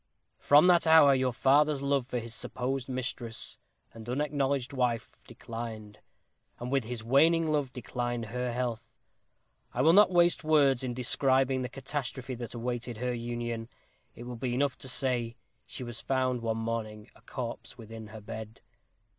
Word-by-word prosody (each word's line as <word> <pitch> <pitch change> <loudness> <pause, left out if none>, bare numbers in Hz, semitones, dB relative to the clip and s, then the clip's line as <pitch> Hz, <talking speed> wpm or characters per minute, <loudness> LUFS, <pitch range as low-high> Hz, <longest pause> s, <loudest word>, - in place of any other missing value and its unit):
"From 145 +4 +6
that 175 -2 +5
hour 160 -3 +8
your 130 -1 +1
father's 140 +3 +3
love 140 -3 +1
for 125 - -3
his 115 -1 -5
supposed 130 +2 -3
mistress, 125 -2 -4 0.3
and 115 +1 -10
unacknowledged 140 -1 -1
wife, 120 -3 -1
declined; 110 -2 -7 0.6
and 125 +1 -5
with 135 -4 +1
his 115 -1 -5
waning 160 +7 +4
love 145 -4 0
declined 120 -1 -3
her 125 0 -1
health. 115 -2 -4 0.8
I 125 - +2
will 160 +3 +6
not 205 +1 +7
waste 175 -2 +3
words 140 -5 +4
in 125 -2 -3
describing 130 +1 +2
the 125 - -3
catastrophe 135 -1 -5
that 120 0 -7
awaited 120 0 -3
her 125 +2 -1
union. 120 -1 -4 0.5
It 120 - -9
will 120 0 -7
be 120 +1 -2
enough 140 0 +1
to 130 - -5
say, 125 -4 0 0.3
she - - -6
was 120 -1 -5
found 130 -2 0
one 115 -1 -1
morning 110 -1 -4
a - - -20
corpse 125 0 -6
within 110 -1 -9
her 110 0 -10
bed. 110 +1 -8
125 Hz, 160 wpm, -30 LUFS, 115-135 Hz, 0.8 s, hour